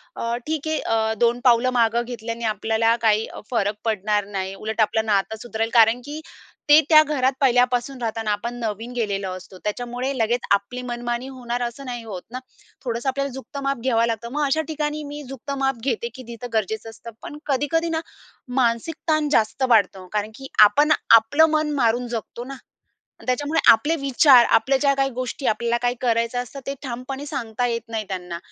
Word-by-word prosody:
अ, 230 0 -2
ठीक 315 -1 -2
आहे. 315 - 0
अ, 220 -1 0
2 235 0 +3
पावलं 245 0 +4
मागे 230 +1 +2
घेतल्याने 230 -1 -5
आपल्याला 225 +2 +2
काही 215 +1 +3 0.2
फरक 205 -3 0
पडणार 210 -1 0
नाही, 195 -1 -4
उलट 220 +2 -3
आपलं 220 +1 +1
नातं 205 +1 0
सुधारेल 225 -1 -2
कारण 230 +1 +5
की 300 +2 -6 0.5
ते 300 +1 +9
ते 310 - 0
त्या 310 -1 +9
घरात 270 -3 +1
पहिल्यापासून 250 0 +2
राहताना 225 -2 -2
आपण 235 +3 -3
नवीन 225 +1 -4
गेलेलो 200 -5 -2
असतो, 185 +1 -13
त्याच्यामुळे 245 +5 -3
लगेच 235 +2 +1
आपली 200 +6 -1
मनमानी 240 +1 -3
होणार 245 -2 -4
असं 270 +4 -10
नाही 240 -2 -5
होत 195 -5 -7
ना. 255 - -5 0.5
थोडंसं 240 +2 -1
आपल्याला 275 0 -2
झुकतं 270 +2 -8
माप 275 0 0
घ्यावं 230 -3 +2
लागतं. 230 +1 -3
मग 295 +1 -1
अशा 315 +3 +1
ठिकाणी 300 -1 -3
मी 290 0 -7
झुकतं 270 +1 -6
माप 270 -2 0
घेते, 235 -3 -1
की 260 - -9
तिथं 235 +1 -8
गरजेचं 220 +1 -2
असतं, 230 +1 -11
पण 295 - -8
कधी-कधी 295 +4 0
ना, 320 0 -1 0.6
मानसिक 235 +6 +1
ताण 310 -1 +2
जास्त 220 +4 0
वाढतो, 195 -4 +2
कारण 210 +1 -1
की 270 0 -9 0.2
आपण 300 +1 +2 0.2
आपलं 250 +8 +5
मन 305 0 +1
मारून 240 +2 +2
जगतो 235 +1 -5
ना? 275 +1 -7 0.7
त्याच्यामुळे 290 +5 0
आपले 290 +9 +4
विचार, 270 -2 +6
आपल्या 270 +4 +2
ज्या 280 -1 +4
काही 270 0 +1
गोष्टी 255 +2 -4
आपल्याला 235 +2 +1
काय 245 +1 0
करायचं 230 0 0
असतं 275 +3 -10
ते 275 - -2
ठामपणे 265 +2 -6
सांगता 245 -5 -2
येत 235 -1 -1
नाही 220 -2 -3
त्यांना 180 -3 -5
240 Hz, 185 wpm, -22 LUFS, 225-275 Hz, 0.7 s, ते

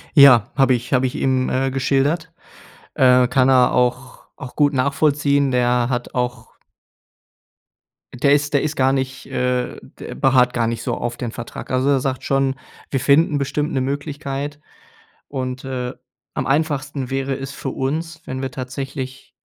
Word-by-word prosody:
Ja, 130 -6 +7
habe 135 -1 +4
ich. 125 +2 -2
Habe 130 +1 +3
ich 125 - -2
ihm, 130 -1 +1
äh, 135 +1 0
geschildert. 140 +5 0 0.6
Äh, 125 -1 +5
kann 130 +1 +3
er 125 -2 +5
auch 125 +1 0 0.2
auch 130 -2 -9
gut 145 -1 +3
nachvollziehen. 140 +1 +2
Der 125 -1 +2
hat 120 -1 -3
auch 125 -2 -3 1.6
Der 140 +3 +3
ist 150 +1 +1
der 145 - +3
ist 150 0 -2
gar 130 0 +3
nicht 130 -1 -3
äh, 125 0 -1
d - - -10
beharrt 130 -2 +3
gar 115 -2 +1
nicht 115 -1 -3
so - - -1
auf 120 0 -3
den 120 -2 -5
Vertrag. 120 -1 -8
Also, 130 +2 +1
er 140 -2 +3
sagt 130 -1 -2
schon, 135 -1 +1 0.3
wir 135 - 0
finden 145 +2 +3
bestimmt 145 +3 -1
'ne 135 - 0
Möglichkeit. 145 +1 -4 0.7
Und, 130 -2 -4
äh, 125 -2 -4 0.4
am - - -2
einfachsten 140 -2 -1
wäre 135 0 -1
es 135 0 -6
für 140 - -5
uns, 155 +5 -3
wenn 130 +1 -5
wir 130 - -3
tatsächlich 130 0 -6
135 Hz, 165 wpm, -20 LUFS, 125-140 Hz, 1.6 s, Ja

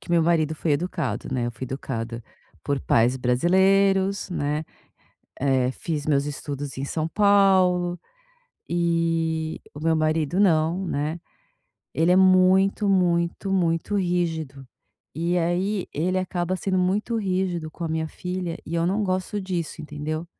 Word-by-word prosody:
que - - -11
meu 170 -1 +4
marido 160 -2 +2
foi 155 0 -1
educado, 165 0 -2
né. 120 -2 0
Eu - - -2
fui 120 +3 -7
educada 115 -3 -5 0.4
por 140 -1 -1
pais 120 +2 +2
brasileiros, 190 +9 +2
né. 150 -2 -2 0.8
Eh, 130 -2 +2
fiz 150 +1 -4
meus 140 -2 +2
estudos 145 -1 -5
em 140 - -2
São 155 +2 -2
Paulo 185 -3 +3 0.7
e 165 -2 0
o 145 - -9
meu 165 0 +2
marido 155 +2 0
não, 175 -1 +2
né. 150 +3 -2 0.7
Ele 165 +3 +2
é 180 - +5
muito 190 +2 +4
muito 180 0 +1
muito 170 +2 0
rígido. 165 -7 -2 0.5
E 170 +2 0
aí 180 +4 0
ele 180 +5 0
acaba 185 -1 -1
sendo 190 0 -1
muito 200 +6 0
rígido 185 -6 -1
com 170 - -8
a - - -1
minha 160 0 -2
filha 180 0 -5
e 165 - -4
eu 165 0 +1
não 200 +4 0
gosto 185 +2 -2
disso 175 -3 -4
entendeu? 155 +2 -5
170 Hz, 145 wpm, -24 LUFS, 155-185 Hz, 0.8 s, é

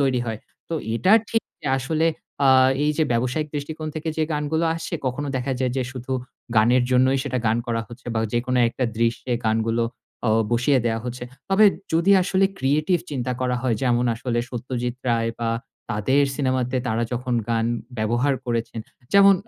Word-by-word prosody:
তৈরি 130 -3 +2
হয় 110 -2 -3 0.3
তো 165 - -2 0.2
এটা 185 - +3 0.2
ঠিক 225 - +1 0.4
আসলে 155 +5 0 0.4
আ - - +5 0.4
এই 150 - +3
যে 155 - +4
ব্যবসায়িক 125 +6 0
দৃষ্টিকোণ 155 +2 -4
থেকে 160 0 -4
যে 160 - +1
গানগুলো 150 +2 0
আসে 165 0 -5
কখনো 140 +3 -2
দেখা 130 +1 -1
যায় 125 -1 +1
যে 130 - +1
শুধু 130 +1 -5 0.4
গানের 120 +4 +5
জন্যই 130 +2 +4
সেটা 130 -2 -1
গান 110 +1 +3
করা 115 -1 0
হচ্ছে 120 +1 -13
বা 110 - +1
যেকোনো 125 +1 0
একটা 125 +2 -2
দৃশ্যে 115 +2 0
গানগুলো 115 +1 +1 0.4
অ - - +3 0.2
বসিয়ে 130 +3 +3
দেওয়া 115 -1 0
হচ্ছে। 125 0 -5 0.3
তবে 200 +3 +6 0.3
যদি 170 +4 +3
আসলে 190 +1 +2
ক্রিয়েটিভ 155 +6 +2
চিন্তা 125 -2 -2
করা 125 -1 0
হয় 120 -4 +1
যেমন 125 -1 +2
আসলে 120 +1 -2
সত্যজিৎ 120 0 -3
রায় 115 -1 +1
বা 115 -1 -1 0.4
তাদের 130 +7 +2
সিনেমাতে 130 -2 0
তারা 115 +1 0
যখন 125 0 -1 0.2
গান 115 0 +1 0.3
ব্যবহার 120 +6 +1
করেছেন 115 -1 -2 0.3
যেমন, 200 0 +8
125 Hz, 170 wpm, -23 LUFS, 120-145 Hz, 0.4 s, যেমন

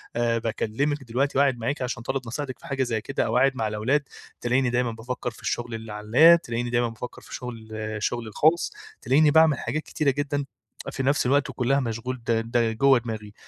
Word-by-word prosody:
آآ، 120 0 +1
باكلمِك 115 +6 -1
دلوقتي 130 +3 -1
وقاعد 135 -3 +3
معاكِ 135 +5 -2
عشان 125 -1 -3
طالب 130 +2 -2
نصيحتِك 130 +2 -5
في - - -13
حاجة 135 -1 0
زي 115 -3 -1
كده، - - -1
أو 115 +2 0
قاعد 135 +1 +3
مع 110 -3 -1
الأولاد 110 +8 0 0.4
تلاقيني 125 +1 +2
دايمًا 120 0 0
بافكر 120 +2 -5
في - - -16
الشغل 120 0 -3
اللي 110 -1 -7
على 105 0 -7
اللاب 165 +9 +7
تلاقيني 120 -2 -3
دايمًا 120 0 +1
بافكر 115 +2 -8
في - - -9
شغل 120 -3 -7 0.3
شغلي 115 0 -2
الخاص، 160 +9 +2 0.3
تلاقيني 150 +2 +4
باعمل 160 -3 +5
حاجات 155 - -2
كتيرة 150 -3 0
جدًا 145 +1 -2 0.5
في 135 - -3
نفس 140 +1 +2
الوقت، 140 +2 +2
وكلها 135 +2 +1
مشغول 125 0 -4
د - - +2 0.2
د 115 -2 +1
جوا 135 +1 +5
دماغي، 110 -3 -6
125 Hz, 200 wpm, -25 LUFS, 115-140 Hz, 0.5 s, اللاب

